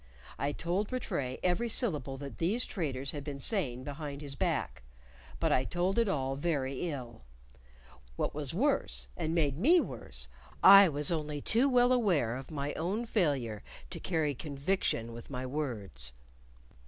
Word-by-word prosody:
I 140 Hz, -, 0 dB
told 180 Hz, -, -1 dB
Rattray 140 Hz, -, -2 dB
every 185 Hz, +7 st, +1 dB
syllable 150 Hz, -, 0 dB
that 140 Hz, -5 st, -8 dB
these 210 Hz, +9 st, +1 dB
traitors 140 Hz, -, -2 dB
had 145 Hz, -2 st, -6 dB
been 140 Hz, -1 st, -5 dB
saying 135 Hz, -, -1 dB
behind 145 Hz, 0 st, -6 dB
his 140 Hz, -1 st, -3 dB
back, -, -, -1 dB, 0.6 s
but -, -, +1 dB
I 130 Hz, -, +3 dB
told 180 Hz, -, 0 dB
it 230 Hz, -, +3 dB
all 135 Hz, -7 st, 0 dB
very 140 Hz, 0 st, -1 dB
ill; 125 Hz, -6 st, -6 dB, 0.9 s
what -, -, -1 dB
was 145 Hz, -2 st, -2 dB
worse, 275 Hz, -, 0 dB
and 165 Hz, -1 st, -2 dB
made 145 Hz, -3 st, +1 dB
me 330 Hz, -, +6 dB
worse, 115 Hz, -, -5 dB, 0.4 s
I 195 Hz, -1 st, +10 dB
was 145 Hz, +1 st, -1 dB
only 150 Hz, -3 st, -2 dB
too 235 Hz, -, +3 dB
well 245 Hz, -1 st, +5 dB
aware 180 Hz, -, +2 dB
of 130 Hz, 0 st, -7 dB
my 145 Hz, -2 st, -3 dB
own 195 Hz, +9 st, -2 dB
failure 140 Hz, -, 0 dB, 0.3 s
to -, -, -5 dB
carry 160 Hz, -5 st, 0 dB
conviction 140 Hz, -4 st, -1 dB
with 115 Hz, 0 st, -10 dB
my 130 Hz, -2 st, -4 dB
words. 105 Hz, -, -4 dB
150 Hz, 155 wpm, -31 LUFS, 130-190 Hz, 0.9 s, I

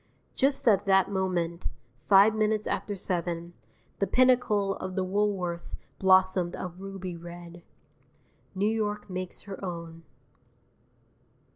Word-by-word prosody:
Just 275 Hz, -1 st, +1 dB
at 205 Hz, -2 st, +4 dB
that 195 Hz, 0 st, +4 dB
moment 180 Hz, -3 st, -1 dB, 0.4 s
five 200 Hz, +2 st, +7 dB
minutes 215 Hz, 0 st, +1 dB
after 205 Hz, -, -2 dB
seven 175 Hz, -2 st, -3 dB, 0.5 s
the 200 Hz, -, +1 dB
pinnacle 245 Hz, -6 st, +3 dB
of 185 Hz, 0 st, -6 dB
the 190 Hz, -, 0 dB
Woolworth 185 Hz, -3 st, -1 dB, 0.2 s
blossomed 185 Hz, -2 st, +4 dB
a 185 Hz, -, -4 dB
ruby 190 Hz, 0 st, -7 dB
red. 175 Hz, 0 st, -10 dB, 0.9 s
New 195 Hz, +2 st, 0 dB
York 210 Hz, -2 st, -2 dB
makes 185 Hz, 0 st, -5 dB
her 195 Hz, -1 st, -8 dB
own. 170 Hz, -2 st, -6 dB
190 Hz, 115 wpm, -28 LUFS, 175-205 Hz, 0.9 s, five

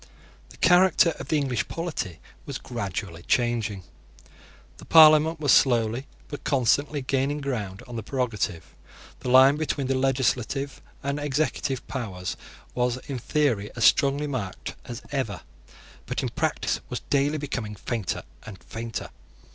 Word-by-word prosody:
The -, -, -15 dB
character 180 Hz, -1 st, +5 dB
of -, -, -7 dB
the 155 Hz, -, +2 dB
English 130 Hz, -7 st, -1 dB
polity 155 Hz, -, -4 dB, 0.3 s
was -, -, -4 dB
gradually 100 Hz, -7 st, -5 dB
changing. 115 Hz, -2 st, 0 dB, 0.9 s
The -, -, -12 dB
Parliament 155 Hz, 0 st, +7 dB
was 145 Hz, -3 st, +2 dB
slowly, 120 Hz, 0 st, +3 dB, 0.2 s
but 145 Hz, -, -8 dB
constantly, 140 Hz, +2 st, +1 dB
gaining 135 Hz, +2 st, 0 dB
ground 110 Hz, -9 st, -4 dB
on 120 Hz, -1 st, -6 dB
the -, -, -2 dB
prerogative. 110 Hz, -, -3 dB, 0.5 s
The -, -, -4 dB
line 130 Hz, +3 st, +7 dB
between 150 Hz, -3 st, -1 dB
the 135 Hz, -, +1 dB
legislative 135 Hz, +1 st, 0 dB, 0.2 s
and 140 Hz, +1 st, -1 dB
executive 145 Hz, -2 st, -1 dB
powers 95 Hz, -9 st, -4 dB, 0.4 s
was 125 Hz, 0 st, 0 dB
in 135 Hz, -3 st, -4 dB
theory 120 Hz, -7 st, 0 dB
as 115 Hz, -, +2 dB
strongly 140 Hz, +1 st, +4 dB
marked 125 Hz, -10 st, -4 dB
as 120 Hz, +1 st, -7 dB
ever, 130 Hz, -7 st, -2 dB, 0.7 s
but -, -, -2 dB
in -, -, -1 dB
practice -, -, -1 dB
was -, -, -4 dB
daily 145 Hz, +2 st, +2 dB
becoming 120 Hz, -8 st, -4 dB
fainter 105 Hz, -2 st, -3 dB, 0.2 s
and 110 Hz, -3 st, -9 dB
fainter. 115 Hz, 0 st, -6 dB
130 Hz, 140 wpm, -26 LUFS, 115-145 Hz, 0.9 s, Parliament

